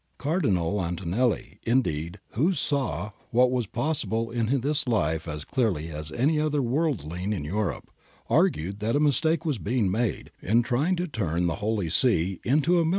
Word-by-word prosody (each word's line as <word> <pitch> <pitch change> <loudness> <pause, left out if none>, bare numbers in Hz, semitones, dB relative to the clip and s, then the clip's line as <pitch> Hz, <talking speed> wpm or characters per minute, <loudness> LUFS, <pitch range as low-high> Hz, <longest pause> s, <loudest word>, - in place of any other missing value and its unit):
Cardinal 105 - 0
Antonelli, 95 +7 -1
indeed, 90 - 0
who 160 - +1
saw 140 -9 -1 0.2
what 125 +2 +4
was 125 -4 0
possible 115 -3 -1
in 115 -1 0
this 145 +1 +1
life 80 -8 0
as 75 -1 -5
clearly 100 - 0
as 75 0 -6
any 150 +6 +2
other 150 -1 +1
worldling 120 - -1
in 95 -8 -2
Europe, 95 -1 -2 0.4
argued 90 +7 +1
that 110 +4 0
a - - +3
mistake 155 +3 +2
was 145 -8 0
being 105 -3 0
made 110 +1 -1
' - - -32
in 115 +6 +3
trying 140 +10 +1
to 180 +1 -2
turn 90 - -1
the 80 -3 0
Holy 105 -6 -1
See 95 -6 +2
into 155 +7 +3
a - - +3
military - - 0
^F. - - +1
115 Hz, 175 wpm, -26 LUFS, 90-140 Hz, 0.4 s, what